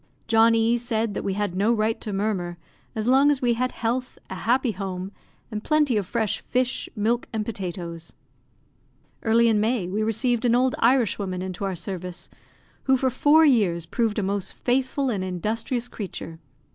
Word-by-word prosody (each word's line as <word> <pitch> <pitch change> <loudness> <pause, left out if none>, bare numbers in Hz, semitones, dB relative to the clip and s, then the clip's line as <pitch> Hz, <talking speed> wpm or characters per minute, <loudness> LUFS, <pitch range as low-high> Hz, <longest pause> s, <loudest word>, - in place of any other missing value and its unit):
John 225 0 +5
E 230 +1 +2
said 225 -3 -1
that - - -3
we 195 - -1
had 205 -3 -1
no 205 +5 +2
right 220 -1 0
to 215 - -4
murmur, 195 -4 -2 0.4
as 220 0 -2
long 270 +3 +5
as 290 -2 +2
we 245 -2 +2
had 255 +2 -1
health, 250 +2 -2
a - - -2
happy 245 +5 +1
home, 190 -1 -5 0.4
and 210 0 -4
plenty 300 -5 +2
of 205 -3 0
fresh 220 -1 -1
fish, 255 +1 -1
milk, 230 +3 0
and 215 -2 -2
potatoes. 175 -5 -5 1.1
Early 230 +1 +4
in 220 -2 +3
May, 220 -3 0
we 200 +4 -2
received 225 +2 0
an 240 -1 +3
old 255 +1 +3
Irishwoman 210 -7 +1
into 190 +1 -4
our 190 -1 -2
service, 180 0 -5 0.5
who 265 -1 +4
for 260 0 +1
four 300 +5 +5
years 195 - +3
proved 225 +3 -1
a 210 - 0
most 195 0 -2
faithful 260 +1 0
and 195 -4 -2
industrious 225 +7 -2
creature. 180 -7 -7
225 Hz, 175 wpm, -24 LUFS, 195-245 Hz, 1.1 s, John